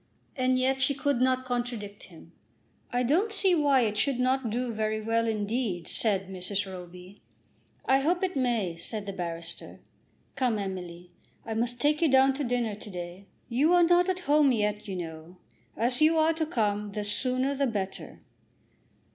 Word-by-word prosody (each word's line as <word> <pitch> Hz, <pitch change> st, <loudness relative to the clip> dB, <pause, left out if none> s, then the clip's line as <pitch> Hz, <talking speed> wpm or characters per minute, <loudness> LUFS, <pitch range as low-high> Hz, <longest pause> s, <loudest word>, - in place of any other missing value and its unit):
And 255 Hz, -1 st, +2 dB
yet 265 Hz, +1 st, +1 dB
she 275 Hz, +2 st, +3 dB
could 280 Hz, -2 st, 0 dB
not 255 Hz, 0 st, +2 dB
contradict 240 Hz, -5 st, -4 dB
him. 165 Hz, -1 st, -16 dB, 0.6 s
"I 245 Hz, +1 st, +1 dB
don't 345 Hz, -, +2 dB
see 390 Hz, -3 st, +3 dB
why 285 Hz, -5 st, +4 dB
it 210 Hz, -3 st, 0 dB
should 275 Hz, -3 st, +1 dB
not 255 Hz, -1 st, +1 dB
do 240 Hz, +2 st, -2 dB
very 215 Hz, 0 st, -1 dB
well, 230 Hz, +1 st, 0 dB
indeed," 215 Hz, -4 st, -2 dB
said 195 Hz, -4 st, +1 dB
Mrs. 190 Hz, +2 st, -2 dB
Roby. 180 Hz, +1 st, -11 dB, 0.6 s
"I 265 Hz, 0 st, +4 dB
hope 350 Hz, +6 st, 0 dB
it 370 Hz, -1 st, -1 dB
may," 230 Hz, -10 st, 0 dB
said 205 Hz, +5 st, -4 dB
the 200 Hz, -, -5 dB
barrister. 170 Hz, -2 st, -5 dB, 0.6 s
"Come, 250 Hz, -5 st, +1 dB
Emily, 180 Hz, -3 st, -6 dB, 0.3 s
I 225 Hz, -, -4 dB
must 240 Hz, +2 st, -1 dB
take 300 Hz, +4 st, +2 dB
you 330 Hz, -, +4 dB
down 265 Hz, 0 st, +5 dB
to 285 Hz, +2 st, -3 dB
dinner 240 Hz, -3 st, -1 dB
to 210 Hz, +1 st, -9 dB
day. 180 Hz, +1 st, -8 dB, 0.2 s
You 290 Hz, +9 st, +3 dB
are 350 Hz, -, +6 dB
not 350 Hz, +2 st, +4 dB
at 370 Hz, 0 st, -1 dB
home 295 Hz, -4 st, +4 dB
yet, 210 Hz, -3 st, -1 dB
you 195 Hz, -, -4 dB
know. 165 Hz, 0 st, -8 dB, 0.4 s
As 245 Hz, +4 st, +1 dB
you 320 Hz, +1 st, +5 dB
are 320 Hz, +1 st, +4 dB
to 315 Hz, -1 st, -2 dB
come, 210 Hz, -6 st, -1 dB
the 210 Hz, 0 st, -3 dB
sooner 255 Hz, +6 st, +1 dB
the 275 Hz, 0 st, 0 dB
better." 200 Hz, -5 st, -5 dB
235 Hz, 175 wpm, -28 LUFS, 200-270 Hz, 0.6 s, are